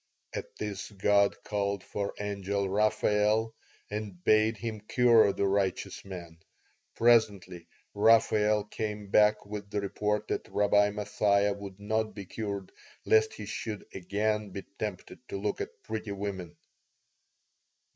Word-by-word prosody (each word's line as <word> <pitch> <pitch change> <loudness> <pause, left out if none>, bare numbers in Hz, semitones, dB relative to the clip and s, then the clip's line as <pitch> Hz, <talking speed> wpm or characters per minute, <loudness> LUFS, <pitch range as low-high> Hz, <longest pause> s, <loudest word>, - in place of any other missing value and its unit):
"At - - -6
this 100 -3 -5
God 100 0 +2
called 100 -2 -2
for 100 -1 -4
Angel 100 -1 -2
Raphael 105 +2 +2 0.3
and 105 -4 -6
bade 110 +2 +4
him 110 -1 -4
cure 115 -1 +5
the 100 - -1
righteous 95 -1 -1
man. 85 -4 -9 0.6
Presently 100 -7 +2 0.3
Raphael 105 -1 +4
came 105 -1 -5
back 105 0 +4
with 105 -1 -7
the 105 - -1
report 105 +1 -1
that - - -3
Rabbi 105 0 +3
Mathia 105 -1 +1
would 100 -1 -9
not 110 +1 -1
be 100 -2 -7
cured 100 -1 -5 0.3
lest 110 0 +4
he 105 - -7
should 110 0 -5
again 105 +3 -1
be 95 +1 -7 0.2
tempted 105 -4 -5
to - - -3
look 105 +1 -2
at - - -7
pretty 110 -2 -4
women. 95 -3 -5
105 Hz, 130 wpm, -29 LUFS, 100-110 Hz, 0.6 s, cure